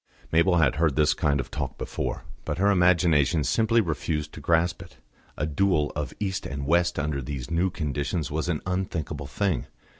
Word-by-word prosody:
Mabel 85 Hz, +2 st, +4 dB
had 75 Hz, -4 st, +3 dB
heard 80 Hz, -4 st, +2 dB
this 75 Hz, -1 st, +4 dB
kind 70 Hz, -2 st, +1 dB
of 65 Hz, -, -4 dB
talk -, -, -4 dB
before, -, -, -4 dB, 0.2 s
but 75 Hz, -, -3 dB
her 100 Hz, +3 st, +3 dB
imagination 85 Hz, -4 st, +3 dB
simply 115 Hz, -, +3 dB
refused 75 Hz, -3 st, -2 dB
to -, -, -8 dB
grasp 85 Hz, +3 st, +1 dB
it. -, -, -13 dB, 0.4 s
A 75 Hz, -, 0 dB
duel 75 Hz, 0 st, +1 dB
of 75 Hz, -4 st, -3 dB
East 95 Hz, -2 st, -2 dB
and 70 Hz, -1 st, -4 dB
West 85 Hz, +3 st, +2 dB
under 75 Hz, -2 st, -1 dB
these 65 Hz, +1 st, -6 dB
new 85 Hz, +3 st, +2 dB
conditions 75 Hz, -1 st, -2 dB
was 80 Hz, +3 st, -1 dB
an 80 Hz, -3 st, -1 dB
unthinkable 90 Hz, -6 st, -3 dB
thing. 90 Hz, +5 st, -1 dB
80 Hz, 180 wpm, -26 LUFS, 75-90 Hz, 0.4 s, Mabel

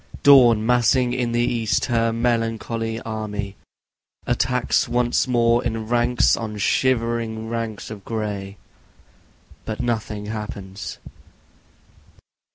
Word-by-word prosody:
Dawn 120 Hz, -6 st, +7 dB
massing 125 Hz, +1 st, +3 dB
in 120 Hz, -2 st, -1 dB
the 120 Hz, 0 st, +1 dB
east 115 Hz, -3 st, 0 dB
her 115 Hz, -2 st, +1 dB
melancholy 115 Hz, -1 st, -1 dB
army 105 Hz, -3 st, -5 dB, 0.7 s
Attacks 125 Hz, 0 st, +1 dB
once 120 Hz, +1 st, +1 dB
more 120 Hz, -1 st, +2 dB
in 115 Hz, -2 st, -3 dB
ranks 120 Hz, +1 st, +2 dB
on 110 Hz, -2 st, -5 dB
shivering 115 Hz, -1 st, 0 dB
ranks 115 Hz, -2 st, -4 dB
of 105 Hz, -3 st, -9 dB
gray, 105 Hz, -3 st, -4 dB, 1.1 s
But 110 Hz, -1 st, -5 dB
nothing 110 Hz, -3 st, -2 dB
happens. 105 Hz, -2 st, -6 dB
115 Hz, 100 wpm, -22 LUFS, 110-120 Hz, 1.1 s, Dawn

